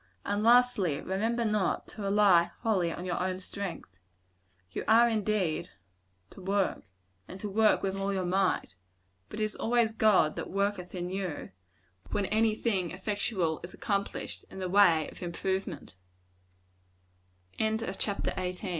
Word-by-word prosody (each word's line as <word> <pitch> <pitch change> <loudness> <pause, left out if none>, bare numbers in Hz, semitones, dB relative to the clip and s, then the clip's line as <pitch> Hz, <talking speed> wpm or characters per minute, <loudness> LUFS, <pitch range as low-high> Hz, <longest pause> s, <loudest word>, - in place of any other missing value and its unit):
And, 205 +1 0
lastly, 230 -9 +4
remember 225 +5 -1
not 210 -3 0
to 215 - -10
rely 195 -4 +4
wholly 190 -7 +1
on 175 - -6
your 180 -1 -2
own 185 0 -1
strength. 180 - -7 0.7
You - - -4
are, 230 +2 +6
indeed, 205 -6 0 0.6
to - - -12
work 195 +1 0 0.5
and 185 - -9
to 210 - -4
work 215 +2 +3
with 195 0 -1
all 195 +1 -1
your 190 -2 -1
might; 185 - 0 0.5
but 215 - -7
it - - +1
is 215 0 -2
always 235 -1 +2
God 215 -8 +3
that - - -4
worketh 200 -2 -2
in 180 0 -4
you, 190 -5 -4 0.6
when 200 - 0
any 220 +2 +2
thing 195 -7 0
effectual 190 -3 -1
is 175 - -8
accomplished, 200 -1 -3
in - - -11
the 185 -1 -3
way 175 -5 +5
of - - -14
improvem 185 -2 -3
195 Hz, 135 wpm, -30 LUFS, 180-215 Hz, 0.7 s, are